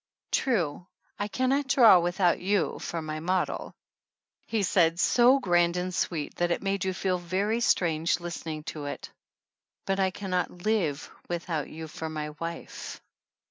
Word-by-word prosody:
"True, 180 - 0 0.3
I 205 - -1
can 255 +4 0
not 275 +1 +1
draw 230 -9 +7
without 175 +1 +2
you 195 -1 0
for 165 -1 -4
my 155 0 -4
model," 180 +3 -1 0.7
he 220 -3 0
said' 170 -2 +3
so 245 +7 +5
grand 175 -5 +2
and 180 +1 -2
sweet 160 -4 -2
that 175 0 +1
it 170 - -1
made 195 -1 0
you 190 - +1
feel 185 -1 -1
very 195 +6 0
strange 170 -7 +2
listening 165 -3 -5
to 150 -2 -6
it, 145 - -6 0.7
"but 195 0 0
I 190 -1 +3
can 190 0 -7
not 180 0 -2
live 175 -10 0 0.2
without 170 -3 -3
you 160 0 -7
for 160 +1 -6
my 150 -1 -4
wife." 165 0 -6
175 Hz, 160 wpm, -28 LUFS, 165-195 Hz, 0.7 s, draw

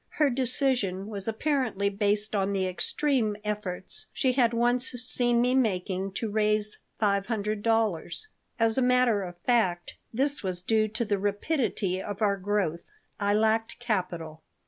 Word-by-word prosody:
Her 295 -3 +4
decision 245 -6 0
was 205 -2 -6
apparently 225 -4 0
based 205 +1 0
on 200 -1 +1
the 190 -1 0
extreme 220 +3 0
efforts 205 -4 -3
she 260 - +1
had 245 -2 +3
once 240 +1 +2
seen 245 -1 +2
me 250 +1 +3
making 195 -5 0
to 220 +2 -3
raise 215 0 +1 0.2
five 200 -2 +1
hundred 215 -2 -2
dollars. 225 - 0 0.3
As 225 +1 +2
a - - +2
matter 250 -4 +3
of 175 -2 -7
fact, 185 -8 +1 0.2
this 280 +5 0
was 180 -2 -3
due 215 +2 +2
to 220 +2 -2
the 205 -2 0
rapidity 205 - -1
of 205 0 -5
our 200 -1 +2
growth. 190 -4 -1 0.3
I 205 0 +2
lacked 220 +1 +1
capital. 175 -9 -3
215 Hz, 150 wpm, -28 LUFS, 195-240 Hz, 0.3 s, Her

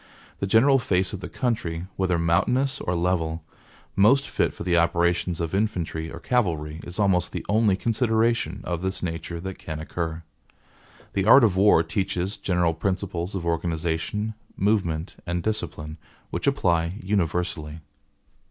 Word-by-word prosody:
The 100 - -1
general 135 +7 +5
face 95 -4 0
of 100 - -4
the - - -7
country, 90 -10 -2
whether 90 -2 +1
mountainous 125 +12 +1
or 90 - -1
level, 85 -2 0 0.5
most 130 +8 +5
fit - - 0
for - - -8
the 90 -1 +1
operations 85 0 +2
of 85 -2 -2
infantry 85 -6 -1
or 80 - -7
cavalry, 80 -10 0
is 85 - -8
almost 95 -4 +2
the - - -4
only 105 -2 +3
consideration 115 - +1
of 85 -1 -3
this 95 +1 -3
nature 85 0 -4
that 95 +1 -6
can 80 -1 -6
occur. 80 +1 -4 0.9
The 95 -1 0
art 130 +5 +8
of 105 -5 +4
war 100 +2 +5
teaches 95 -1 -2
general 90 -3 +1
principles 95 +1 -2
of 90 -3 -3
organization, 85 +5 -1 0.2
movement, 95 -5 0
and 85 0 -1
discipline, 80 -8 -4 0.3
which - - -3
apply 85 +1 +1
universally.) 85 -5 -1
90 Hz, 145 wpm, -25 LUFS, 85-105 Hz, 0.9 s, art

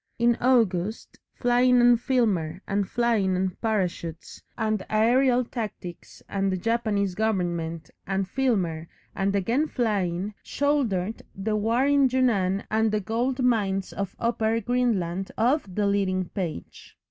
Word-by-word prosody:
In 235 0 +3
August 220 -5 +1 0.2
flying 245 0 +3
and 240 0 +6
Filmer 195 - 0
and 200 -1 -1
flying 225 -6 +1
and 185 0 -2
parachutes 180 -6 -3 0.2
and 215 -3 0
aerial 245 +3 +3
tactics 210 -7 -7
and 195 -1 -1
the 185 - -1
Japanese 210 -2 0
Government 175 -6 -2 0.2
and 195 0 -1
Filmer 185 -11 -1 0.3
and 195 +1 0
again 235 +11 +1
flying, 205 - -1
shouldered 230 -9 -1
the 215 +3 -2
war 225 +5 +1
in 280 -2 +4
Yunnan 205 -7 +1
and 220 0 +2
the 215 - +1
gold 240 +5 -1
mines 200 -6 0
of 195 -1 -4
Upper 225 -1 0
Greenland 200 -6 -1
off 250 +4 +2
the 205 +3 0
leading 190 -2 0
page. 170 - -6
215 Hz, 130 wpm, -25 LUFS, 190-240 Hz, 0.3 s, and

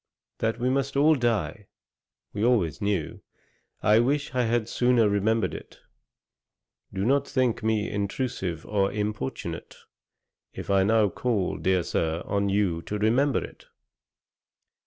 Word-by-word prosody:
That 115 0 0
we 125 +1 -1
must 135 +1 -1
all 150 +3 +5
die, 110 - -1 0.7
we 105 - -2
always 110 -8 +1
knew; 100 -1 -2 0.6
I 105 +2 +5
wish 140 +5 0
I 125 -1 +1
had 115 -1 0
sooner 120 -2 +3
remembered 105 +2 +1
it. - - -10 1.1
Do 95 0 -2
not 140 +3 +2
think 130 -4 0
me 110 -1 0
intrusive 100 - -3
or 100 -2 0
importunate, 105 -9 -4 0.8
if - - -5
I 95 -1 +4
now 110 0 +3
call, 105 -2 -1
dear 95 -2 +1
Sir, 80 +1 -1
on 100 0 0
you 95 -4 +1
to 105 +5 -4
remember 120 +7 +2
it.' - - -12
110 Hz, 135 wpm, -26 LUFS, 100-120 Hz, 1.1 s, all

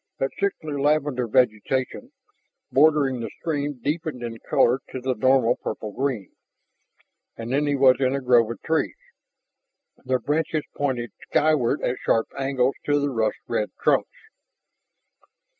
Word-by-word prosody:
That 135 - -1
sickly 155 -8 -2
lavender 145 -4 +1
vegetation 130 - 0 0.6
bordering 140 -3 +4
the 115 -2 -4
spring 145 -5 -3
deepened 150 -3 -2
in 115 -1 -6
color 125 +3 +3
to 130 - -5
the 130 +1 -1
normal 130 0 +3
purple 110 -1 -5
green, 130 -4 -3 1.1
and 115 +2 -4
then 145 +2 +1
he 145 - +1
was 130 -2 +5
in 130 +1 +2
a - - -1
grove 120 -4 +4
of 115 - -6
trees, 160 0 0 1.1
their 130 -1 +1
branches 150 +2 -1
pointed 125 -5 -2 0.2
skyward 150 -3 +2
at 125 - 0
sharp 115 - +1
angles 135 -1 +1
to 145 0 +3
the 145 0 -1
rust 110 -3 0
red 105 - -1
trunks. - - +2
130 Hz, 140 wpm, -24 LUFS, 120-145 Hz, 1.1 s, was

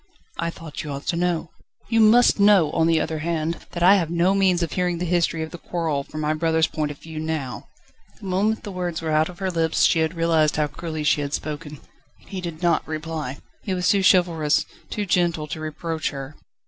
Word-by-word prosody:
"I 170 - 0
thought 165 -2 -8
you 155 - -7
ought 140 0 -5
to - - +1
know." 175 -1 -1 0.4
"You 225 -1 +2
must 225 +1 +6
know, 200 -7 +5
on 165 0 +2
the 165 -1 +3
other 155 0 -2
hand, 165 0 -2
that 170 - -2
I 195 +3 +7
have 170 -4 -1
no 175 +3 +2
means 190 -3 +2
of 165 - -3
hearing 180 -1 0
the 180 - -2
history 170 -2 +1
of 160 - -7
the 175 - -8
quarrel 160 -6 -2
from 155 +2 -7
my 150 0 +1
brother's 160 0 +2
point 155 -2 -2
of 145 - -7
view 160 +1 -8
now." 155 -5 -4 0.5
The - - -11
moment 200 +4 0
the 205 - -6
words 175 -3 -3
were 160 - -1
out 155 +2 +2
of 180 - -11
her 190 0 -2
lips 165 -2 +1
she 165 - +4
had 160 +2 0
realised 165 -2 +2
how 150 - +2
cruelly 155 +1 -5
she 150 0 +2
had 145 0 -2
spoken. 150 -1 -6 0.4
He 190 -2 -8
did 170 -1 -6
not 170 -1 +2
reply; 155 -3 -4 0.2
he 190 - -2
was 180 0 0
too 200 -2 +3
chivalrous, 170 -5 +3 0.2
too 210 - -2
gentle, 170 -4 +1
to 155 +1 -6
reproach 160 +1 -3
her. 140 +1 -7
165 Hz, 225 wpm, -23 LUFS, 155-180 Hz, 0.5 s, I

